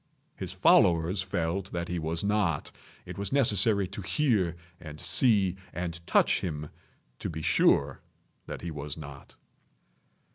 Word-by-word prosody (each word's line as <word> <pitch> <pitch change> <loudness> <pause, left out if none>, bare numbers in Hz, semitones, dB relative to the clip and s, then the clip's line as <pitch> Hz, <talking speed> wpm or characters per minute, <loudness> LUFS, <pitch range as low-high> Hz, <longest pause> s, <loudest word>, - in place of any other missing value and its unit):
His - - -6
followers 85 +2 +4
felt 95 +1 -2
that 85 0 -2
he 90 0 -2
was 80 +2 -2
not. 100 -6 0 0.3
It - - -8
was 100 - -3
necessary 105 -6 +2
to 100 +1 -7
hear 100 - +1 0.2
and 80 -3 -10
see 100 - +2 0.2
and 85 -1 -4
touch - - +3
him 75 -4 -4 0.5
to - - -4
be 80 -1 -6
sure 70 -2 +3 0.5
that - - -6
he 85 - -4
was 75 -1 -6
not. 70 -3 -11
85 Hz, 140 wpm, -28 LUFS, 80-100 Hz, 0.5 s, followers